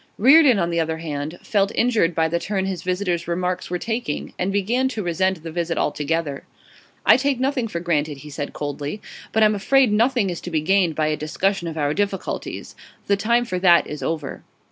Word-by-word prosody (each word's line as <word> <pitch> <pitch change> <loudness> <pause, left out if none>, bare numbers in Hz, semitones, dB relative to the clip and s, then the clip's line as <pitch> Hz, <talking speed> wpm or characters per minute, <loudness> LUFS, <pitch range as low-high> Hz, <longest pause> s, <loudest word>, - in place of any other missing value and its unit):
Reardon, 270 +1 +6
on 170 -2 0
the 170 - 0
other 160 0 -1
hand, 155 0 -5
felt 200 -2 +1
injured 225 -9 +2
by 160 0 +2
the 170 +1 -1
turn 195 +1 -2
his 190 -2 -3
visitor's 180 -2 -2
remarks 180 +1 -2
were 180 - -1
taking, 225 -6 -4
and 180 +2 0
began 225 +7 +1
to 225 -5 -4
resent 180 0 0
the 165 - -6
visit 170 0 -2
altogether. 150 -1 -1 0.6
'I - - +7
take 270 -1 0
nothing 260 -2 0
for 170 -6 -4
granted,' 155 -4 -1
he 150 - -9
said 145 0 -4
coldly. 145 +5 -5 0.3
'But 220 - +3
I'm 215 0 +5
afraid 250 +4 +3
nothing 230 -2 +2
is 175 - -6
to - - -6
be 160 -3 0
gained 180 -1 +2
by 155 - +1
a 155 - 0
discussion 175 +4 -1
of 160 -1 -5
our 145 -1 0
difficulties. 200 0 -3 0.3
The 200 - +2
time 235 +4 +1
for 185 -5 -3
that 175 -2 +5
is 150 - -7
over. 155 -4 -4
180 Hz, 205 wpm, -22 LUFS, 160-210 Hz, 0.6 s, I